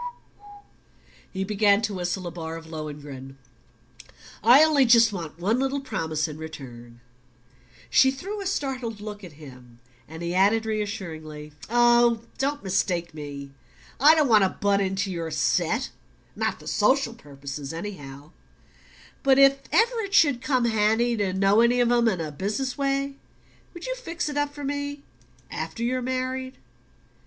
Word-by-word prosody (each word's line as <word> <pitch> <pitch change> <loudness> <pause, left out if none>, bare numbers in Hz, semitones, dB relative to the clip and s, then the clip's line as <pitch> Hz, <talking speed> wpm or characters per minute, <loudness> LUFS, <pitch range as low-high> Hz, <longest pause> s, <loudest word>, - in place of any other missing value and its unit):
He 190 0 -3
began 205 +1 +3
to 210 -2 -1
whistle 180 0 -3
a 175 - -4
bar 165 -1 -6
of 165 0 -9
Lohengrin. 145 -4 -8 1.1
"I 250 +7 +8
only 305 -3 +4
just 230 -3 +5
want 165 -4 -6
one 205 +8 0
little 270 +1 0
promise 160 - -2
in 155 0 -8
return." 120 -6 -10 0.9
She 265 - +6
threw 390 +10 -5
a 390 - -3
startled 260 - -3
look 210 -1 -8
at 175 -4 -10
him 125 -5 -14 0.3
and 160 +2 -8
he 170 +1 -2
added 205 +4 +3
reassuringly: 165 -9 -5 0.2
"Oh, 240 -1 +4 0.2
don't 285 +2 -1
mistake 175 -3 -1
me. 140 -2 -8 0.5
I 300 +5 +7
don't 305 -3 +3
want 220 -4 +5
to 190 - +3
butt 200 +1 0
into 195 +1 -1
your 165 -2 -4
set - - 0 0.4
not - - -1
for - - -14
social 270 -3 +2
purposes, 140 -6 -8
anyhow; 155 -5 -8 0.9
but 270 -1 +4
if 275 0 +6
ever 465 +1 +3
it 400 -2 -2
should 285 -6 +4
come 255 -3 +1
handy 225 +2 +2
to 200 -3 0
know 195 +3 +3
any 240 +1 +3
of 240 -1 +3
'em 240 -1 +3
in 190 -6 +1
a 155 -2 -4
business 210 - -3
way, 275 0 -1 0.6
would 345 - -8
you - - -3
fix 345 -10 -4
it 295 - -5
up 290 0 0
for 290 0 -9
me 285 0 -4 0.5
AFTER 165 +8 -5
YOU'RE 255 +2 0
MARRIED?'" 260 +1 -3
210 Hz, 155 wpm, -25 LUFS, 160-265 Hz, 1.1 s, I